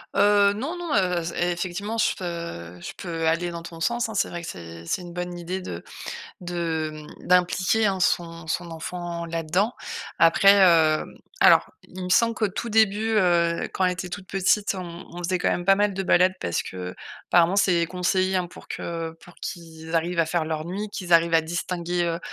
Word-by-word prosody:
Heu, 205 Hz, 0 st, +5 dB
non, 275 Hz, +12 st, -4 dB
non, 345 Hz, -3 st, -4 dB
heu, 180 Hz, -3 st, +2 dB
z 170 Hz, -, -4 dB
effectivement 175 Hz, +5 st, -2 dB
je 220 Hz, -, +2 dB
peu 170 Hz, -, -6 dB
je -, -, -7 dB
peux 165 Hz, -3 st, -3 dB
aller 170 Hz, +2 st, +1 dB
dans 170 Hz, -1 st, -7 dB
ton 165 Hz, -1 st, -9 dB
sens, 235 Hz, +6 st, 0 dB
hein. -, -, -6 dB
C'est 200 Hz, -, +1 dB
vrai 170 Hz, -1 st, -6 dB
que -, -, -7 dB
c'est 85 Hz, -1 st, -9 dB
c'est 180 Hz, -, -1 dB
une 175 Hz, -1 st, -9 dB
bonne 180 Hz, 0 st, -4 dB
idée 180 Hz, +2 st, -4 dB
de 85 Hz, -, -7 dB, 0.6 s
de 165 Hz, -3 st, -2 dB
mmh, 150 Hz, -1 st, -12 dB
d'impliquer, 180 Hz, +4 st, +3 dB
hein, 190 Hz, -1 st, -1 dB
son 165 Hz, -2 st, 0 dB
son 170 Hz, +2 st, -3 dB
enfant 170 Hz, +1 st, -5 dB
là-dedans. 165 Hz, +7 st, 0 dB, 0.5 s
Après, 180 Hz, +4 st, +7 dB
heu, 160 Hz, -2 st, +3 dB, 0.3 s
alors, -, -, +6 dB, 0.2 s
il 185 Hz, 0 st, -8 dB
me 180 Hz, -, -4 dB
semble 230 Hz, +4 st, +4 dB
qu'au 215 Hz, -3 st, 0 dB
tout 235 Hz, +4 st, -4 dB
début, 220 Hz, 0 st, +3 dB
heu, 170 Hz, -3 st, +2 dB
quand 190 Hz, -, +1 dB
elle 180 Hz, -, +2 dB
était 180 Hz, 0 st, -6 dB
toute 190 Hz, +1 st, -7 dB
petite, 195 Hz, +2 st, +1 dB
on 175 Hz, -2 st, -7 dB
on 175 Hz, 0 st, -7 dB
faisait 185 Hz, +1 st, 0 dB
quand -, -, +1 dB
même 175 Hz, -, -1 dB
pas 195 Hz, -, +7 dB
mal 205 Hz, -1 st, +1 dB
de 195 Hz, -, -2 dB
balades 185 Hz, +1 st, +4 dB
parce 85 Hz, -, -1 dB
qu'apparemment 130 Hz, -, -1 dB
c'est 175 Hz, -4 st, +3 dB
conseillé, 185 Hz, +1 st, 0 dB
hein, 180 Hz, -, +1 dB
pour 175 Hz, -, -14 dB
que 165 Hz, -1 st, -4 dB
pour 180 Hz, -, -15 dB
qu'ils 160 Hz, -1 st, -6 dB
arrivent 170 Hz, +1 st, 0 dB
à 165 Hz, -, +3 dB
faire 165 Hz, 0 st, 0 dB
leurs 155 Hz, -1 st, -3 dB
nuits, 200 Hz, +5 st, -4 dB
qu'ils 180 Hz, -2 st, -6 dB
arrivent 170 Hz, 0 st, +5 dB
à 165 Hz, -, +6 dB
distinguer, 175 Hz, +1 st, -2 dB
heu, 170 Hz, 0 st, -1 dB
175 Hz, 200 wpm, -25 LUFS, 165-190 Hz, 0.6 s, Après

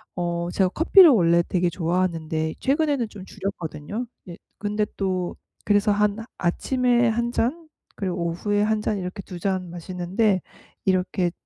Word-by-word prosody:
어 170 Hz, -1 st, -2 dB
제가 190 Hz, -1 st, +2 dB
커피를 340 Hz, -, +7 dB
원래 170 Hz, -7 st, +4 dB
되게 180 Hz, -1 st, +1 dB
좋아하는데 165 Hz, -2 st, -1 dB
최근에는 280 Hz, -4 st, +1 dB
좀 200 Hz, -3 st, -10 dB
줄였거든요. 195 Hz, +2 st, -5 dB, 0.2 s
네 175 Hz, -2 st, -9 dB, 0.2 s
근데 210 Hz, 0 st, 0 dB
또 185 Hz, -2 st, -2 dB, 0.3 s
그래서 205 Hz, 0 st, +3 dB
한 210 Hz, 0 st, +2 dB, 0.2 s
아침에 245 Hz, +6 st, +2 dB
1 235 Hz, +1 st, 0 dB
잔 310 Hz, +8 st, -1 dB, 0.3 s
그리고 185 Hz, -3 st, -3 dB
오후에 205 Hz, +5 st, 0 dB
1 215 Hz, 0 st, +1 dB
잔 210 Hz, -, -1 dB
이렇게 185 Hz, +2 st, -5 dB
2 180 Hz, -2 st, -8 dB
잔 185 Hz, -1 st, -1 dB
마시는데 185 Hz, +3 st, 0 dB, 0.4 s
이렇게 185 Hz, -1 st, +1 dB
190 Hz, 290 characters per minute, -24 LUFS, 175-215 Hz, 0.4 s, 커피를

